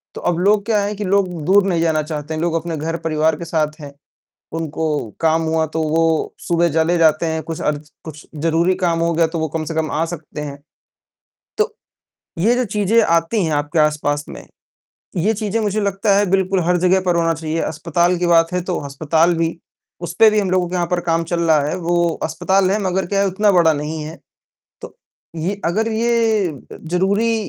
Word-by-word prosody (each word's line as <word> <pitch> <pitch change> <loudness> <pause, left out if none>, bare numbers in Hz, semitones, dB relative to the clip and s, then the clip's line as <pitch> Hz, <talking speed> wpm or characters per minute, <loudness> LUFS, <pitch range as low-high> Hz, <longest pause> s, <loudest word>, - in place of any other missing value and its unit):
तो - - -7
अब 175 -1 0
लोग 200 +2 +2
क्या 220 -2 +2
है 205 +1 -3
कि 210 - -4
लोग 195 0 +2 0.2
दूर 195 +1 +4
नहीं 170 -3 +1
जाना 160 -2 +1
चाहते 155 0 -5
हैं, 155 - -3
लोग 170 -1 0
अपने 165 -1 -3
घर 165 +2 -3
परिवार 155 0 +1
के 170 - -7
साथ 155 -1 -1
हैं। 140 -1 -9 0.7
उनको 160 0 -3 0.4
काम 160 0 +3
हुआ 160 0 +1
तो 160 - +1
वो 160 0 +1
सुबह 170 0 +2
चले 165 +2 +2
जाते 160 0 +3
है, 160 -1 -1
कुछ 160 +1 -6
अर्ज 150 0 -2
कुछ 155 -1 -10 0.2
ज़रूरी 170 +3 +2
काम 165 -1 +1
हो 170 0 +1
गया 165 0 +2
तो 165 0 -4
वो 160 - -1
कम 160 +1 -3
से 165 - -4
कम 160 -1 -1
आ 160 - 0
सकते 155 -3 -7
हैं। 145 -1 -6 1.0
तो, 445 +2 +1 0.7
ये 225 +8 +3
जो 250 0 0
चीज़ें 210 +2 +2
आती 170 +3 +1
हैं 160 - -2
आपके 150 +2 0
आस-पास 150 -1 +1
में, - - -10 0.7
ये 210 +6 +1
चीज़ें 215 +1 -2
मुझे 210 +1 0
लगता 200 0 +1
है 205 - +2
बिल्कुल 190 0 +2
हर 180 +1 +2
जगह 185 +2 +3
पर 175 -1 +2
होना 165 -1 +2
चाहिए, 160 +1 -3
अस्पताल 170 +3 0
की 175 - 0
बात 165 0 +3
है 180 - 0
तो 180 0 -3
अस्पताल 160 +4 +1
भी। 165 0 -1 0.4
उस 175 - -5
पे 225 - +8
भी 215 0 +2
हम 195 - -2
लोगों 185 -1 +1
के 180 - -6
यहाँ 175 -1 0
पर 180 -1 0
काम 165 -1 0
चल 170 0 -2
रहा 160 -3 +3
है, 180 - -2
वो 175 0 +1 0.2
अस्पताल 190 +4 +1
है 205 - +1
मगर 185 -1 -1
क्या 200 +1 0
है 200 - +2
उतना 205 +2 +2
बड़ा 170 -3 +4
नहीं 150 +1 -4
है। 160 +2 -8 0.6
तो - - -10 0.4
ये 195 +5 -3
अगर 220 +6 0
ये 225 -3 +1 0.3
अ, - - -8
ज़रूरी 195 +7 +1
170 Hz, 215 wpm, -19 LUFS, 160-195 Hz, 1.0 s, पे